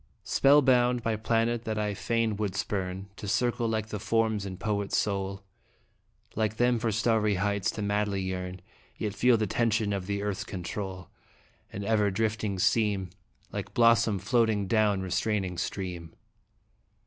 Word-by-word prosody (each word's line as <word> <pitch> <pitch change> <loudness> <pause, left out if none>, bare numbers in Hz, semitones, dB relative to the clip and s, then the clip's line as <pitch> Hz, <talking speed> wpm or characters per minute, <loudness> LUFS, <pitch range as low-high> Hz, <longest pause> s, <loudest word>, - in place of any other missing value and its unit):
"Merope - - -35
mortalis - - -41
nupsit." - - -10
Spellbound, 125 -4 +5
by 115 -1 0
planet 115 +1 0
that 110 -1 -2
I 105 -1 -1
fain 115 +1 0
would 105 -3 -2
spurn, 95 -1 -3
To 105 - -7
circle 120 +2 +1
like 110 -1 -2
the 105 - -4
forms 110 -1 0
in 95 -1 -6
poet's 100 0 -1
soul, 100 -1 -2 0.9
Like 110 0 -1
them 120 0 +3
for 115 -1 0
starry 110 -1 +2
heights 100 +1 0
to 105 - -3
madly 105 -1 0
yearn, 90 0 -4 0.4
Yet 105 -2 -3
feel 125 +1 +4
the 110 - 0
tension 110 0 +1
of 95 -2 -3
the 100 0 -2
Earth's 100 -1 -2
control, 95 -1 -6 0.6
And 100 +1 -5
ever 105 -1 +2
drifting 105 0 -1
seem 100 -2 +1 0.4
Like - - -6
blossom 115 -3 +4
floating 110 0 +1
down 105 -1 +2
restraining 95 -1 -1
stream. 90 -3 -5
105 Hz, 160 wpm, -28 LUFS, 100-115 Hz, 0.9 s, Spellbound